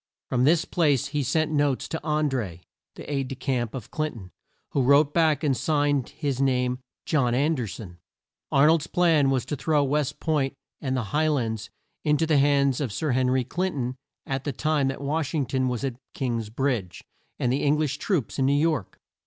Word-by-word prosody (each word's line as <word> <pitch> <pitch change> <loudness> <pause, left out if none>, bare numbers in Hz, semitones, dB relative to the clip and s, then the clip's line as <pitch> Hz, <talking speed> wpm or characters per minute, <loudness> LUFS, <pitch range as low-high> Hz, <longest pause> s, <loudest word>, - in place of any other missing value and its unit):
From 125 0 +2
this 165 +3 +4
place 145 -5 +1
he 150 0 -1
sent 155 +4 0
notes 145 -3 +1
to 160 - -3
An 150 0 +1
dré, 105 - -3 0.3
the - - -10
aide 140 -3 -1
de 135 - -5
camp 125 -3 -2
of 125 -5 -7
Clin 155 -2 -2
ton, 95 -5 -11 0.4
who 140 - +1
wrote 140 +3 +4
back 160 -2 +2
and 140 -3 +2
signed 145 -2 +1
his 140 -3 -3
name 125 -2 +1 0.3
John 125 -6 +2
An 145 +5 +2
der 125 -7 -2
son. 90 -4 -9 0.5
Ar 140 +1 +5
nold's 160 0 +3
plan 165 -6 +3
was 130 -3 0
to 145 - -3
throw 150 +1 +1
West 145 0 -1
Point 145 -4 0 0.3
and 130 -2 -1
the 110 -5 -4
High 155 +1 +3
lands 115 -6 -1 0.3
in 150 -1 +3
to 160 - +1
the 155 -3 +3
hands 140 -1 +3
of 130 -6 -2
Sir 150 +8 -1
Hen 130 0 +2
ry 130 0 +2
Clin 180 +9 -2
ton 125 -1 -2 0.3
at 135 0 -3
the 145 - -2
time 150 +1 +1
that 135 +1 -3
Wash 150 +2 -1
ing 145 -3 +1
ton 130 0 0
was 125 -1 -2
at 130 -3 -2 0.2
King's 115 -5 -2
Bridge, 115 -7 -2 0.3
and 125 - 0
the 135 - 0
Eng 145 +1 +3
lish 150 -3 -1
troops 160 - -1
in 135 - +3
New 140 - +3
York. 150 - 0
140 Hz, 210 wpm, -25 LUFS, 125-150 Hz, 0.5 s, Ar